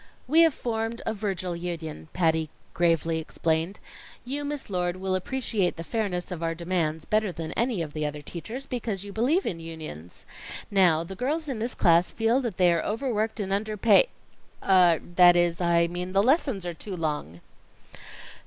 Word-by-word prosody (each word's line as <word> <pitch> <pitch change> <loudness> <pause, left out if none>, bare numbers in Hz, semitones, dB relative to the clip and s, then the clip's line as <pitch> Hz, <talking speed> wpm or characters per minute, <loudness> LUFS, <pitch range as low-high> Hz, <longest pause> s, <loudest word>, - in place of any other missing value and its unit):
"We 315 +5 +5
have 325 -3 +5
formed 225 0 -3
a 220 - 0
Virgil 190 -4 -3
Union," 170 -3 -5
Patty 160 -3 +1 0.2
gravely 165 -1 +2
explained. 160 +3 -1 0.5
"You, 280 +4 -3
Miss 290 -1 -4
Lord, 180 -2 -1
will 190 0 -2
appreciate 200 -1 -1
the 165 - -6
fairness 195 -3 -2
of 175 -2 -5
our 165 0 -1
demands 165 -2 -1
better 215 -2 +1
than 165 -1 -6
any 235 -7 0
of 150 -2 -8
the 155 - -3
other 150 0 -6
teachers, 230 - -7
because 225 -7 -3
you 200 - -8
believe 275 - +2
in 165 - -3
unions. 155 - -8 0.5
Now, 175 -5 +4
the 170 - -8
girls 295 - -2
in 260 -6 -3
this 235 +3 -2
class 170 0 +4
feel 230 +3 +1
that 235 -8 -4
they 180 -2 +5
are 170 - +1
overworked 220 -1 -1
and 195 -2 -3
underpa 215 - +4 0.6
er 180 -4 +6 0.2
that 175 -1 +8
is, 175 0 +2
I 170 -1 +3
mean 180 +2 -4
the 195 +1 +4
lessons 260 - +2
are 175 - -3
too 190 +3 -6
long." 150 - -3
185 Hz, 175 wpm, -26 LUFS, 165-225 Hz, 0.6 s, that